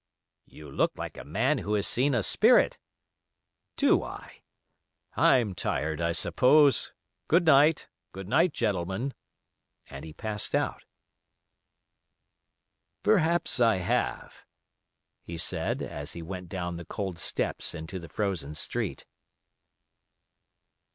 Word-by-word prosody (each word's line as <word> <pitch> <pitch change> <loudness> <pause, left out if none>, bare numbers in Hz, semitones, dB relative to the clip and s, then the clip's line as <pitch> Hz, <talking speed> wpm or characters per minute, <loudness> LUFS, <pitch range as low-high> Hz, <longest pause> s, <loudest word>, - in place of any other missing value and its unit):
"You 75 - -13
look - - 0
like - - -6
a - - -9
man 115 - 0
who 105 0 -2
has 100 -1 +1
seen 135 +2 +2
a 110 - +1
spirit." - - +4 1.0
"Do - - +3
I? - - -10 0.7
I'm 115 -6 +3
tired, 80 -2 -2
I 85 0 +1
suppose. 135 - +4 0.4
Good 170 +2 +3
night,—good 140 - +2
night, 165 - +3
gentlemen," 105 +2 -2 0.8
and 70 +1 -8
he 80 - -8
passed 105 +2 -3
out. - - -2 2.2
"Perhaps 170 -7 +2
I 115 -3 +4
have," 90 -1 -2 0.9
he 85 - -8
said - - -2
as 75 0 -6
he 85 - -7
went 90 +1 -7
down 90 -2 -4
the 85 - -8
cold 95 -3 -5
steps - - -3
into 80 +3 -6
the 85 -2 -11
frozen 85 -6 -3
street. - - -2
95 Hz, 115 wpm, -28 LUFS, 85-130 Hz, 2.2 s, spirit